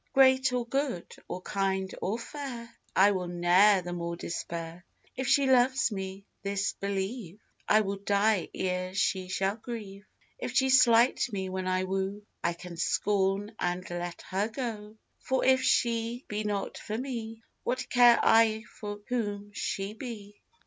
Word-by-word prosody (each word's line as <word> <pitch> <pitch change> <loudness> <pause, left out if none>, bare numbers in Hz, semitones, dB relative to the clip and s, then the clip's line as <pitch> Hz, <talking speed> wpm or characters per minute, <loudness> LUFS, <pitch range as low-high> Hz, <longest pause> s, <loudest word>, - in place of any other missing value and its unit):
Great 260 -1 +5
or 250 -1 -1
good, 265 -7 -2 0.2
or 185 - -6
kind 190 -1 -1
or 205 +4 -1
fair, 235 -2 -7 0.2
I 200 +2 +6
will 185 -2 -2
ne'er 180 +3 +4
the 175 0 -5
more 170 0 -3
despair; 170 0 -5 0.3
If 260 0 -3
she 275 +1 +4
love 260 0 +4 0.2
me, 195 0 -5 0.2
this 200 0 -1
believe, 200 0 -4 0.3
I 215 - +6
will 200 -1 -2
die 200 -1 +1
ere 185 0 -2
she 190 -2 0
shall 195 +3 -1
grieve; 210 -4 -7 0.4
If 250 -1 -5
she 265 +1 +4
slight 245 0 +5
me 190 -2 -3
when 185 0 -3
I 185 0 +1
woo, 195 +2 -2 0.2
I 170 - +1
can 170 0 -10
scorn 200 +3 0
and 180 +1 -2
let 175 0 -5
her 195 +3 -1
go; 220 -3 -5 0.2
For 260 0 0
if 260 0 +5
she 235 -1 +1
be 210 0 -3
not 205 -1 -2
for 215 - -4
me, 230 -3 -5 0.2
What 255 +1 -2
care 245 -1 +6
I 225 -1 +4 0.2
for 205 -1 -6
whom 205 -4 -3
she 195 0 -3
be? 215 -4 -9
205 Hz, 155 wpm, -29 LUFS, 190-235 Hz, 0.4 s, I